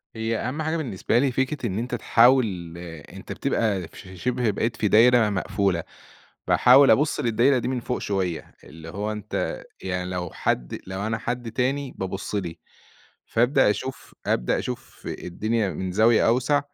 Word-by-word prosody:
هي 110 0 -1
أهم 130 +6 -3
حاجة 160 +1 -1
بالنسبة 120 - 0
لي 135 -1 +2
فكرة 130 +1 -1
إن 100 +2 -2
أنت 120 +1 -3
تحاول 115 -10 +3 0.3
أنت - - -10
بتبقى 100 -7 -1
في 95 -1 -12
شِبْه 125 +2 0
بقيت 115 +4 -1
في 105 - 0
دايرة 115 +1 +5
مقفولة، 95 -3 0 0.6
باحاول 135 +3 +6
أبُص 150 +1 +2
للدايرة 120 +3 +3
دي 120 - -2
من 130 -1 -1
فوق 125 +1 -3
شوية، 95 -4 -3
اللي 80 +1 -11
هو 105 +5 -3
أنت 105 -2 -4 0.2
يعني 90 -1 -3
لو 90 -2 -3
حد - - -2
لو 95 +3 -3
أنا 115 0 -1
حد 120 0 -4
تاني 135 +3 -1
بابُص 95 +2 -4
لي، 85 -4 -3 0.7
فأبدأ 125 0 +3
أشوف 130 +5 -5
أبدأ - - +1
أشوف - - -7
الدنيا 105 +3 -2
من 90 +3 -4
زاوية 110 +3 +4
أوْسع 130 +5 +3
110 Hz, 160 wpm, -24 LUFS, 95-125 Hz, 0.7 s, باحاول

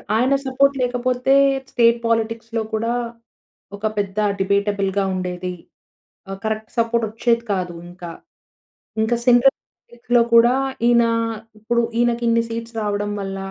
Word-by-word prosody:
ఆయన 255 +4 +2
సపోర్ట్ 275 +1 +2
లేకపోతే 250 +2 +1 0.4
స్టేట్ 235 -1 +4
పోలిటిక్స్‌లో 230 0 -1
కూడా, 230 +2 0 0.8
ఒక 215 +2 -1
పెద్ద 200 0 -2 0.2
డిబేటబుల్‌గా 200 0 0
ఉండేది. 180 0 -4 0.8
ఆహ్, 195 0 -6
కరెక్ట్ 220 0 -3
సపోర్ట్ 230 0 +1
వచ్చేది 235 +1 0
కాదు 180 -2 -3
ఇంకా. 175 -1 -9 0.9
ఇంక 220 +2 +1
సెంట్రల్ 245 +2 +5 0.3
సీట్‌లో 240 0 +1
కూడా 240 +2 +6 0.3
ఈయన, 235 -1 +5 0.6
ఇప్పుడు 235 +2 0 0.2
ఈయనకి 240 0 +1
ఇన్ని 230 0 +3
సీట్స్ 230 0 -6
రావడం 205 0 -2
వల్ల 195 0 -5
230 Hz, 120 wpm, -21 LUFS, 200-240 Hz, 0.9 s, కూడా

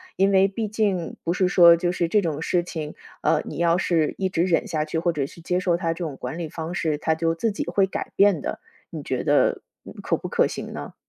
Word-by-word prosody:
因 195 +1 +3
为 195 0 +5
毕 215 +2 -3
竟 200 -5 -1
不 170 - -1
是 185 0 +2
说 170 -2 +7
就 175 +1 0
是 170 -2 -1
这 210 +4 +2
种 155 -3 -3
事 175 +1 +1
情， 155 -3 -6 0.3
呃， - - +2
你 150 - -7
要 170 0 +3
是 165 -5 +1
一 190 -1 -1
直 170 - -1
忍 170 -3 +1
下 155 -1 -1
去， 155 +1 -4
或 170 +1 +1
者 140 -3 -2
是 170 - -14
接 180 +2 0
受 175 -2 +1
他 165 -2 -1
这 175 - -6
种 145 -4 -5
管 130 +7 -6
理 160 -3 -4
方 165 +2 -6
式， 155 -4 -1
他 160 +1 0
就 165 +1 0
自 220 +6 0
己 - - -4
会 195 -1 +2
改 190 - -5
变 195 -7 +4
的， - - -4 0.3
你 - - -7
觉 - - -2
得， - - +2 0.2
嗯， - - -10
可 - - 0
不 - - -6
可 - - +2
行 - - -7
呢？ - - -7
170 Hz, 275 characters per minute, -24 LUFS, 160-185 Hz, 0.3 s, 说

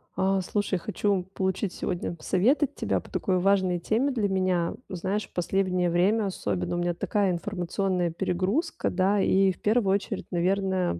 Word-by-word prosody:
А, 190 0 +1
слушай, 200 0 -1
хочу 200 -1 0
получить 190 0 -1
сегодня 175 -1 -3
совет 225 - +2
от 275 - -2
тебя - - 0
по - - -14
такой 185 -1 0
важной 185 -2 +2
теме 230 +10 +1
для 225 -6 0
меня. 185 -3 0 0.2
Знаешь, 190 +3 -3
последнее 180 0 0
время 195 +6 +2
особенно 100 - -2
у - - -1
меня 175 0 0
такая 195 +3 0
информационная 180 0 -1
перегрузка, 190 - -1
да. 195 +2 +2
И 195 0 +4
в 180 - -11
первую 210 -2 +2
очередь, 200 - -3
наверное, 185 - 0
190 Hz, 160 wpm, -27 LUFS, 180-200 Hz, 0.2 s, И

